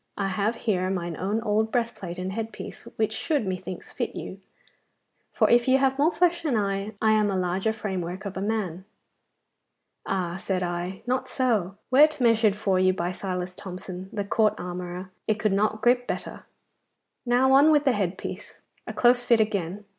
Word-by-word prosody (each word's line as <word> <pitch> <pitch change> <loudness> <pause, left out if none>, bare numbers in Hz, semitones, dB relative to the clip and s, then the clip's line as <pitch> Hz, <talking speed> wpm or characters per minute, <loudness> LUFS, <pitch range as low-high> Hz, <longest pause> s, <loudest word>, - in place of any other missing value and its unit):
I 195 -1 -1
have 205 +4 0
here 185 -6 0
mine 175 -3 -2
own 205 +4 -1
old 220 +1 +1
breastplate 230 -7 -2
and 185 +1 -3
head 225 +2 -4
piece, - - -9
which 220 0 0
should, 290 +1 -1
methinks, 185 -1 -5
fit - - -3
you, - - -7 0.9
for - - +3
if 240 +1 +4
you 260 +1 +5
have 270 0 +1
more 305 +4 +4
flesh 345 -1 +2
than 290 -8 0
I, 200 +1 -1
I 220 - +3
am 215 -1 +3
a 195 - 0
larger 185 +4 0
framework 190 -3 -4
of 200 - -5
a 190 - -3
man. 195 -4 -2 1.2
Ah, 180 -2 -1
said 190 -1 -2
I 175 +2 -4
not 255 +1 -1
so! 215 -8 0
Were't 300 +3 +5
measured 225 -4 +4
for 195 -3 +1
you 185 0 +4
by 175 -1 -2
Silas 180 -1 -4
Thomson, 185 0 -8
the 205 -2 -3
court 215 +1 +2
armourer, 180 +1 -6 0.2
it 215 - +3
could 210 -1 +1
not 215 +2 0
grip 245 +1 +3
better. - - -5 0.8
Now 250 +2 +3
on 280 +3 +7
with 295 -1 +3
the 270 - +5
head 195 -4 -1
piece. - - -8 0.3
A - - -4
close 245 0 +4
fit 235 -2 +4
again. 205 -2 -1
205 Hz, 185 wpm, -26 LUFS, 185-235 Hz, 1.2 s, on